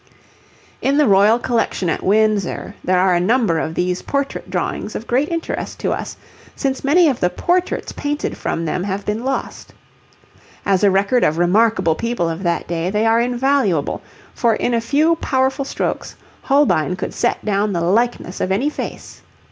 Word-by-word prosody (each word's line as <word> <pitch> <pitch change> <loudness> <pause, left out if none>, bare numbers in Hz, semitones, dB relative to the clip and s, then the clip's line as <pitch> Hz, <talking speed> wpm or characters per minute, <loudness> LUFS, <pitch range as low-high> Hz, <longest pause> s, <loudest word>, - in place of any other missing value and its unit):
In 275 +1 +1
the 300 - +5
Royal 205 +1 +5
Collection 230 -6 -1
at - - -1
Windsor 210 -1 +1
there 185 0 +2
are 185 0 +3
a 175 - +3
number 200 -3 +2
of 160 +1 -3
these 180 0 -1
portrait 280 0 -3
drawings 210 - -3
of 225 - -5
great 260 +6 +1
interest 335 -1 -4
to - - 0
us, - - -4 0.4
since 270 -1 -2
many 320 +5 +4
of 270 -5 0
the 180 - +2
portraits 355 - -1
painted 290 +1 -3
from 165 - -3
them 180 +3 -2
have 200 0 -3
been 215 +3 -2
lost. 270 +1 -4 0.9
As 195 0 +2
a 200 - +6
record 200 +6 +2
of 155 - +2
remarkable 185 0 +3
people 230 -1 -2
of 165 +2 -4
that 170 -2 -1
day 170 +1 -2
they 210 +3 0
are 225 +1 +4
invaluable, 245 - 0 0.3
for 230 -2 +2
in 240 - -1
a 230 - +1
few 305 +7 +2
powerful 265 -1 0
strokes - - -3 0.3
Holbein 270 - +2
could - - -5
set - - -1
down 205 0 +1
the 175 -3 -1
likeness 200 +1 0
of 185 - -1
any 255 +10 +1
face. - - -7
215 Hz, 175 wpm, -19 LUFS, 180-265 Hz, 0.9 s, a